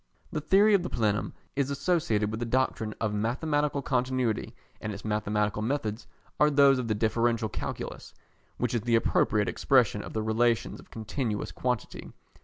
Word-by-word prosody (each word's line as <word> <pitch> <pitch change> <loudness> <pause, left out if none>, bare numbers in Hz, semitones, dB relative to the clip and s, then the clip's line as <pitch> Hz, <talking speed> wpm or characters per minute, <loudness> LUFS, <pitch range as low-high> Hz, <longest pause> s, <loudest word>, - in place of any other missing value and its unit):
The 155 - -2
theory 200 +7 +5
of 200 - +5
the 180 - -4
plenum 105 -3 0 0.2
is 140 -1 0
associated 140 - 0
with 110 - -4
the 120 - -2
doctrine 115 -3 0
of 110 -2 -1
mathematical 140 +6 0
continuity, 125 -3 -1 0.3
and 105 - -3
its 100 +1 -8
mathematical 105 -1 0
methods 110 -2 -2 0.3
are 150 - +6
those 140 -2 +5
of 125 - -3
the 110 - 0
Differential 115 +1 +1
Calculus, - - -6 0.4
which 125 -1 -1
is 120 - +1
the 115 +1 +2
appropriate 105 -2 +2
expression 110 +3 +2
of - - -9
the 110 - -1
relations 115 +1 +1
of - - -16
continuous 110 0 -3
quantity. 125 -3 -3
115 Hz, 165 wpm, -28 LUFS, 110-135 Hz, 0.4 s, are